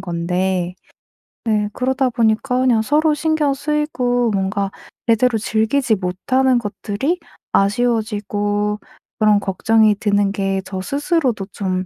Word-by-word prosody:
건데. 180 0 -1 0.7
네 210 -1 +1
그러다 260 +2 0
보니까 230 +1 +1
그냥 245 -4 +3
서로 300 +6 +2
신경 305 -1 +1
쓰이고 260 -5 0
뭔가 195 0 -1 0.3
제대로 230 +1 +3
즐기지 220 +4 +1
못하는 245 +8 +1
것들이 235 - -2 0.3
아쉬워지고 210 -1 0 0.4
그런 210 -1 +4
걱정이 215 +3 +3
드는 205 -1 +2
게 195 -1 -1
저 190 -1 -5
스스로도 280 - 0
좀 185 -2 -2
220 Hz, 260 characters per minute, -19 LUFS, 200-255 Hz, 0.7 s, 그런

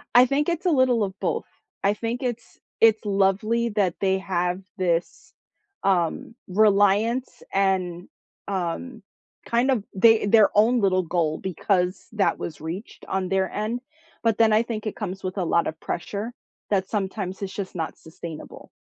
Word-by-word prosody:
I 245 - +9
think 285 +5 +1
it's 340 +2 -2
a - - +4
little 255 -5 +3
of 195 -1 -4
both. - - -1 0.4
I 200 +1 +3
think 235 +4 -3
it's 240 -2 -5 0.2
it's 220 -1 +5
lovely 205 +4 +2
that 200 -5 +1
they 190 -1 +2
have 180 -1 -1 0.2
this, 175 -2 -1 0.5
um, 185 +3 0
reliance 210 +5 +2
and, 185 -3 0 0.4
um, 200 +6 -3 0.5
kind 240 +3 +2
of, 235 -6 +1
they 225 +2 +5
their 215 0 +6
own 230 +4 +4
little 185 -2 +3
goal 160 -2 0
because 185 0 -1
that 205 -3 +1
was 155 -3 -6
reached 170 +7 -7
on 190 -1 -1
their 190 0 +1
end, 220 +4 -2 0.4
but 225 -2 +2
then 225 -1 +5
I 215 - +5
think 225 -2 -5
it 215 - -3
comes 190 -3 -5
with 185 +1 -4
a - - +1
lot 170 0 +2
of 160 - -5
pressure 205 +6 -4 0.4
that 195 -2 +1
sometimes 195 -2 -3
it's 195 -1 -3
just 195 -2 -5
not 165 -2 -4
sustainable. 160 -1 -10
200 Hz, 160 wpm, -24 LUFS, 185-225 Hz, 0.5 s, I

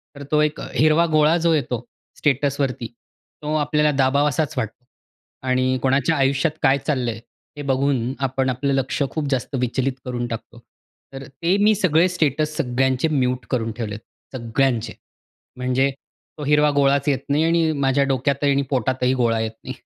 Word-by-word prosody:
तर 140 - -8
तो 150 0 +4
एक 150 0 0
हिरवा 155 +2 +4
गोळा 155 +2 +4
जो 165 - +4
येतो 125 -5 -2 0.3
स्टेटसवरती 140 -3 0 0.6
तो 150 +1 -2
आपल्याला 150 0 +2
दाबावासाच 140 +2 +1
वाटतो 125 +1 -4 0.6
आणि 130 0 +1
कोणाच्या 135 +5 +2
आयुष्यात 135 +3 +2
काय 135 +1 +5
चाललं 130 -5 0
आहे, 110 - -8 0.4
हे - - -5
बघून 135 -2 0
आपण 130 0 -1
आपलं 135 +2 -1
लक्ष 135 +1 -1
खूप 155 -3 -3
जास्त 130 +1 -2
विचलित 125 +2 0
करून 120 -1 -3
टाकतो. 120 +1 -7 0.5
तर 135 - -7
ते 170 +8 0
मी 215 - +5
सगळे 175 -2 +3
स्टेटस 155 -3 0
सगळ्यांचे 130 +3 +1
म्यूट 130 -4 0
करून 115 -3 -1
ठेवले 105 -3 -4
आहेत. 110 +4 -12
सगळ्यांचे. 115 -1 0 0.6
म्हणजे 130 +2 +1 0.5
तो 150 - -6
हिरवा 150 +1 +4
गोळाच 140 0 +3
येत 135 -3 +1
नाही 145 +2 +2
आणि 165 -1 +2
माझ्या 135 +1 +3
डोक्यातही 140 +2 +1
आणि 140 0 +2
पोटातही 130 0 0
गोळा 115 -3 +1
येत 110 - -2
नाही. - - -6
135 Hz, 160 wpm, -22 LUFS, 125-150 Hz, 0.6 s, काय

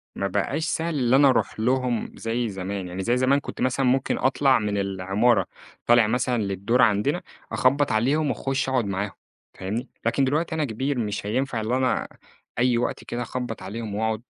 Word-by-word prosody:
ما 100 - -1
بقاش 105 - -1
سَهل 165 0 -1
اللي 125 0 +3
أنا 140 +1 +6
أروح 130 - 0
لهم 125 0 0
زي 115 +1 -2
زمان، 95 -1 -4
يعني 90 +2 -5
زي 120 +5 +2
زمان 130 +2 +3
كنت - - -8
مثلًا 130 +1 +1
ممكن 130 +1 +2
أطلَع 135 0 +3
من 105 -2 -1
العمارة، 95 +2 +1 0.4
طالع 120 -2 +5
مثلًا 120 +1 0
للدور 100 +5 +1
عندنا، 115 - +2 0.3
أخبّط 140 +3 +2
عليهم 140 +8 +2
واخُش 135 0 -1
أقعد 130 -4 +1
معاهم 100 +1 -2 0.4
فاهمني؟ 110 +7 -4 0.2
لكن 140 - +2
دلوقتي 155 +4 0
أنا 155 -2 0
كبير 130 +3 -2
مش 105 -3 -3
هينفع 120 +2 -1
اللي 115 +4 0
أنا 130 -1 0 0.5
أي 125 -1 +3
وقت 120 - -2
كده 120 - -4
أخبّط 120 -2 -4
عليهم 105 +2 -5
وأقعد، 110 +1 -1
120 Hz, 175 wpm, -24 LUFS, 105-130 Hz, 0.5 s, أنا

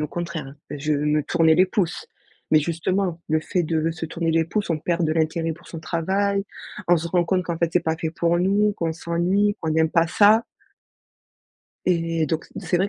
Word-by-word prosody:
au 150 - -1
contraire. 170 -5 -5 0.2
Je 150 +1 -2
me 150 +1 +1
tournais 160 +1 +3
les 185 +3 +4
pouces. 180 -2 -2 0.5
Mais 155 - +7
justement, 170 +2 -1
le 155 - +2
fait 175 +3 -1
de 160 0 0
se 165 0 -5
tourner 165 0 -2
les 165 0 +3
pouces, 200 +2 -2
on 155 - +1
perd 170 +1 0
de 155 - +1
l'intérêt 165 +1 0
pour 160 - -15
son 165 - -7
travail. 195 +5 0 0.4
On 175 - +6
se 165 +1 -3
rend 175 0 +1
compte 185 +1 0
qu'en 170 -2 -3
fait, 170 0 0
c'est 180 - +3
pas 160 0 -1
fait 160 -1 -3
pour 170 +1 +1
nous, 200 +3 +2
qu'on 165 -1 -1
s'ennuie, 180 +5 0
qu'on 160 - -2
n'aime 160 0 +2
pas 165 0 +3
ça 215 +5 +5 1.4
et 165 -2 +1
donc, 160 +2 -2
c'est 180 - 0
vrai 190 +3 +1
165 Hz, 205 wpm, -23 LUFS, 160-180 Hz, 1.4 s, Mais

